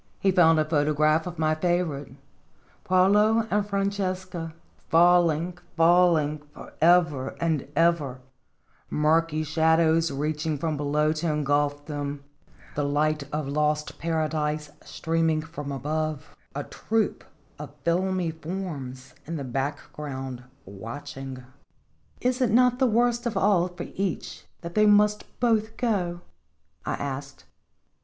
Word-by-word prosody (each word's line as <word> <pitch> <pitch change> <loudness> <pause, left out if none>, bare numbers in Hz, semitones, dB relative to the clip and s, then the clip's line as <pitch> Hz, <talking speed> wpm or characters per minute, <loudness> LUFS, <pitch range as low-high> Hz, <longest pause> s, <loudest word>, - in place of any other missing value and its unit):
He 195 - +3
found 165 -3 +5
a 155 - +2
photograph 155 +1 +2
of 175 -1 -7
my 155 -1 +2
favorite 155 -5 -1 0.4
" - - -34
Paolo 210 +5 +4
and 210 +1 +2
Francesca," 185 -4 -2 0.3
falling, 175 0 +3 0.2
falling, 165 -3 +4
forever 160 -6 +2
and 160 -5 0
ever, 155 -6 +2 0.7
murky 155 +1 +2
shadows 160 +1 +3
reaching 150 +2 -2
from 155 +2 -2
below 150 +1 +1
to 160 +1 -1
engulf 145 0 0
them, 145 -1 -5 0.5
the 145 - -1
light 150 +1 0
of 150 -1 -2
lost 150 +1 -1
Paradise 155 -2 -1
stream 165 0 -1
ing 155 -1 0
from 150 -3 -7
above, 150 +2 -3 0.2
a - - -2
troop 225 -2 -2 0.4
of 145 -1 -9
filmy 180 0 0
forms 155 -7 -6
in 165 - -4
the 145 - -4
background 135 -1 -5 0.2
watching. 130 +6 -8 0.4
" - - -37
Is 250 +1 0
it 250 - +3
not 250 +2 +4
the 260 - +4
worst 240 +1 +2
of 235 - -2
all 185 -3 +3
for 175 -1 -8
each 190 -3 -4
that 170 -1 -7
they 215 0 +4
must 210 0 +4
both 225 -2 +1
go?" 180 -8 -1 0.7
I - - 0
asked. 140 0 -6
160 Hz, 125 wpm, -26 LUFS, 145-180 Hz, 0.7 s, found